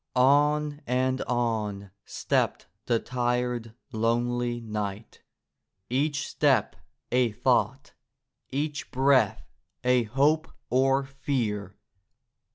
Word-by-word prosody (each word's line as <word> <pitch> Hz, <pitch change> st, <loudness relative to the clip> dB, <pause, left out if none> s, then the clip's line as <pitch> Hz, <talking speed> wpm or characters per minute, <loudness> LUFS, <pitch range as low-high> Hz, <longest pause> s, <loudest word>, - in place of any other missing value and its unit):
On 145 Hz, +3 st, +3 dB
and 130 Hz, +1 st, +1 dB
on 110 Hz, -5 st, -1 dB
stepped -, -, -1 dB, 0.2 s
the 120 Hz, -, +3 dB
tired, 125 Hz, -2 st, -2 dB, 0.2 s
lonely 120 Hz, +2 st, 0 dB
knight, 105 Hz, -2 st, -5 dB, 0.7 s
each 145 Hz, +3 st, 0 dB
step 135 Hz, -8 st, +2 dB, 0.4 s
a 125 Hz, -3 st, +2 dB
thought, -, -, 0 dB, 0.6 s
each 145 Hz, +2 st, -3 dB
breath 130 Hz, -5 st, +2 dB, 0.4 s
a 125 Hz, -1 st, +3 dB
hope 145 Hz, +7 st, +1 dB, 0.2 s
or 135 Hz, +2 st, +3 dB
fear. 120 Hz, -8 st, -3 dB
125 Hz, 85 wpm, -27 LUFS, 115-140 Hz, 0.7 s, On